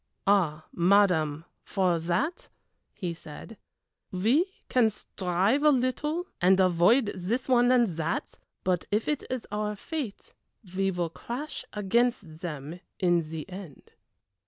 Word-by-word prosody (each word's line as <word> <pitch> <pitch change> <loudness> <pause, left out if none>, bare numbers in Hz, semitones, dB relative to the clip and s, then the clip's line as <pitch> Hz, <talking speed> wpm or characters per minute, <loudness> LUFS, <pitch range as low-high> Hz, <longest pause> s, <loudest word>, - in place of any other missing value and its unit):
"Ah, 170 -6 +2
madame, 170 -5 +3 0.2
for 185 -4 +1
that," 210 - -1 0.4
he 180 -4 -4
said, 165 +7 -10 0.6
"we 245 - +2 0.2
can 245 -3 +4
strive 195 +4 0
a 300 - +6
little 295 +6 0 0.2
and 185 +2 +5
avoid 190 +6 +4
this 200 +8 -2
one 245 -1 +4
and 245 -2 +5
that, 165 0 -2 0.2
but 180 -2 0
if 210 +2 0
it 300 -2 0
is 255 -2 -3
our 210 0 -2
fate 270 - -6 0.4
we 195 0 +2
will 175 -3 -2
crash 255 - -6
against 210 -5 0
them 160 -1 -6 0.2
in 175 -2 +3
the 160 0 -6
end." 185 -6 -10
195 Hz, 130 wpm, -28 LUFS, 175-245 Hz, 0.6 s, a